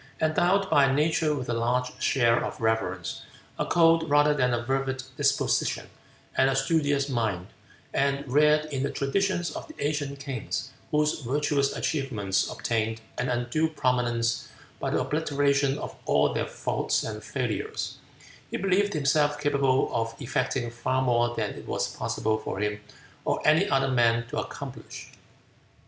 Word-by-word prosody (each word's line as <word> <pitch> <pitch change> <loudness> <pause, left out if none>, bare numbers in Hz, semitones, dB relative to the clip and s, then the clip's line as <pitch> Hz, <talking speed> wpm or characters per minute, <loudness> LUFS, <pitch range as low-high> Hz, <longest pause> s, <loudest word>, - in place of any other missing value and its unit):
Endowed 175 +5 +2
by 145 -5 +4
nature 155 +1 +2
with 130 -3 -4
a 120 - -1
large 125 +2 0
share 120 -3 +3
of - - -5
reverence, 95 -6 -1 0.4
a - - 0
cold 165 -1 +4
rather 145 +1 +5
than 125 -4 +1
a 120 0 -1
fervid 135 0 -1
disposition, 145 -1 +1 0.4
and 135 - +4
a 135 - +1
studious 140 0 +1
mind, 110 -9 -1 0.5
and 140 0 0
reared 150 +3 +4
in 135 - -1
the 140 - 0
traditions 175 +6 0
of - - -7
the 310 - -12
ancient 145 -1 -2
kings, 135 -5 -4 0.2
whose 150 0 +1
virtuous 140 +2 0
achievements 110 -10 -1
obtained 115 -1 -1 0.2
an 125 0 0
undue 125 +6 0
prominence 120 -5 0 0.3
by - - -2
the - - +1
obliteration 140 -2 +1
of - - -6
all - - +3
their - - -1
faults - - -1
and - - -5
failures, 435 0 -3 0.5
he - - -2
believed 195 +1 +1
himself 145 0 +2
capable 140 -3 +2
of 115 0 -1
effecting 125 -2 -1
far 130 +2 0
more 120 -1 +2
than 105 -2 -1
it - - -10
was - - -2
possible 110 0 -1
for 110 - -5
him 105 +1 -2 0.4
or - - 0
any 160 +7 +4
other 135 0 +2
man 115 -2 +3
to - - -3
accomplish. - - -7
135 Hz, 150 wpm, -27 LUFS, 120-150 Hz, 0.5 s, rather